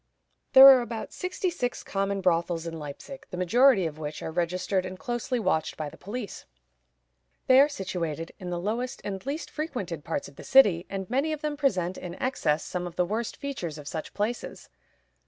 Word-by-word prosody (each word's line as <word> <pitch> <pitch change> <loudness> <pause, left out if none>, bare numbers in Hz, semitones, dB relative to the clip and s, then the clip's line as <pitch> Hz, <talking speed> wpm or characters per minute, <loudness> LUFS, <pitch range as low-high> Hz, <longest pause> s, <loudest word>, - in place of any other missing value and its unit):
There 265 0 +11
are 265 -2 +9
about 235 -2 -6
sixty 365 0 -2
six 245 -7 -3
common 195 0 -1
brothels 170 -2 +1
in 165 -1 -5
Leipzig, 150 - -9
the 180 - -6
majority 230 +3 +4
of 155 -1 -5
which 150 -1 -5
are - - -4
registered 180 +3 0
and 185 0 -6
closely 240 +3 -2
watched 185 -7 0
by 155 -2 -3
the - - -14
police. 210 +2 -7 1.0
They 260 0 +7
are 285 +2 +6
situated 170 - -4
in 180 - -6
the 175 -1 -2
lowest 235 +7 -3
and 195 -2 -5
least 295 +4 -4
frequented 225 - -4
parts 160 -2 -3
of 140 - -16
the - - -9
city, 200 -10 +5
and 195 -1 -4
many 275 +6 0
of 300 - -5
them 300 -1 -2
present, 185 - 0
in 175 -1 -7
excess, 160 - 0
some 180 -1 -4
of 175 - -10
the 180 - +2
worst 220 +5 -3
features 210 - -5
of 145 -1 -10
such 160 0 -6
places. 220 +4 -3
190 Hz, 195 wpm, -27 LUFS, 170-255 Hz, 1.0 s, There